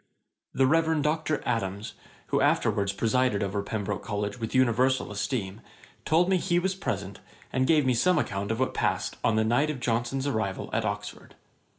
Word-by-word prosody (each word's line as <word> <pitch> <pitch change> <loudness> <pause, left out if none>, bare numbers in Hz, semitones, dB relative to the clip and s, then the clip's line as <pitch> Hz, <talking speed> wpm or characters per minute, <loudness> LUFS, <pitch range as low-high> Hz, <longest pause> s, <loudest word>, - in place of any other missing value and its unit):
19.] - - -11
The 135 - +5
Reverend 160 -2 +2
Dr. 155 0 0
Adams, 105 -3 -2 0.4
who - - +1
afterwards 100 -1 +2
presided 115 0 +1
over 100 +1 -2
Pembroke 105 -1 -3
College 105 +1 -3
with 115 +2 -4
universal 130 0 +2
esteem, 105 -1 -3 0.4
told 170 +3 +3
me 190 0 +3
he 175 0 0
was 185 +2 +1
present, 100 - -4 0.3
and 130 0 +1
gave 155 -4 +4
me 130 - +3
some 180 +10 +3
account 100 0 -2
of 110 +1 -1
what 130 - 0
passed - - -1
on 115 - +2
the 110 - +3
night 125 +7 +2
of 150 -4 -3
Johnson's 120 +3 -1
arrival 110 -8 -2
at - - 0
Oxford. - - -5
120 Hz, 180 wpm, -27 LUFS, 105-145 Hz, 0.4 s, The